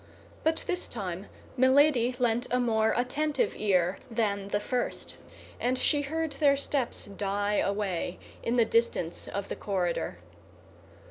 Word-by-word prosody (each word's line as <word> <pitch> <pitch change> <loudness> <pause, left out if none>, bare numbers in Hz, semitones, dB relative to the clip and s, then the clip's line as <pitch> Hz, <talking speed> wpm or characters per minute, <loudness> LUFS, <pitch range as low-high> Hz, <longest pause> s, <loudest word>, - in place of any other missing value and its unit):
But 320 0 +1
this 360 -1 -1
time 190 -3 -5 0.3
Milady 260 -1 +4
lent 240 -1 +1
a 250 - +2
more 220 -2 +2
attentive 300 - +1
ear 185 -3 +2
than 205 -4 0
the 205 +1 0
first, 245 +4 -2 0.4
and 255 +1 +1
she 290 +3 +2
heard 320 +2 -2
their 285 -2 +3
steps 275 -2 -2
die 205 +1 -1
away 195 -3 -1 0.2
in 235 - 0
the 235 -2 +5
distance 225 -7 0
of 200 0 -4
the - - -4
corridor. 175 - -1
230 Hz, 135 wpm, -29 LUFS, 200-260 Hz, 0.4 s, the